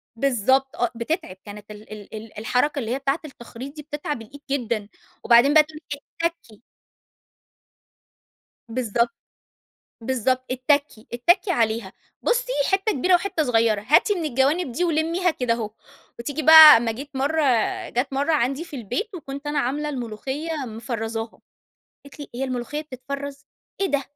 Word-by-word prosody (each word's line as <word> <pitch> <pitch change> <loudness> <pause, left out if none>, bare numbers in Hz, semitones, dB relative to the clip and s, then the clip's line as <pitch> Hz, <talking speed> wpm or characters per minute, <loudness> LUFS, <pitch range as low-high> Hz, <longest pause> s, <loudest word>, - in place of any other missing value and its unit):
بالضبط 265 +1 +1
آه، 240 -1 0
بتتعِب. 235 - -3
كانت 210 0 -10
ال 210 0 -13
ال 210 -2 -11
ال 215 0 -10
الحركة 255 +6 0
اللي 230 -2 -4
هي 265 - -1
بتاعة 275 +3 0
التخريط 265 0 -10
دي 300 - -7
بتتعب 295 -3 -5
الإيد 280 +6 -13
جدًا 230 -6 -1 0.4
وبعدين 240 +5 +6
بقى 310 - +8
تقول 305 0 -12
لك: 285 - -9 0.2
"اتّكّي." 335 -11 -4 2.1
بالضبط. 235 0 0 0.9
بالضبط. 255 +1 0
"اتّكّي، 260 -2 0
اتّكّي 350 - +2
عليها، 225 - 0 0.3
بُصّي - - 0 0.2
حتّة 390 +3 +1
كبيرة 360 +7 +2
وحتّة 355 -3 +1
صغيرة، 225 -4 +2
هاتي 360 +8 +5
من 345 -4 -3
الجوانب 275 +2 +1
دي 355 +9 0
ولمّيها 335 +2 +1
كده 250 -6 -1
أهو." 220 -3 -4 0.5
وتيجي 285 +6 -4
بقى 315 -2 +11
أمّا 230 0 0
جيت 275 +6 -8
مرّة 295 +4 +1 0.5
جات 255 +3 -2
مرّة 285 +4 0
عندي 275 +2 0
في 305 -5 -9
البيت 250 - -4
وكنت 280 -3 -8
أنا 295 0 -1
عاملة 285 +3 -1
الملوخية 265 +4 -5 0.2
مفرّزاها. 225 0 -5 0.6
قالت 280 +1 -14
لي: 290 - -7
"هي 265 - -2
الملوخية 255 +3 -3
بتتفرّز؟ 280 0 -7 0.4
إيه 390 - +2
ده؟ 285 -5 0
270 Hz, 150 wpm, -23 LUFS, 235-305 Hz, 2.1 s, بقى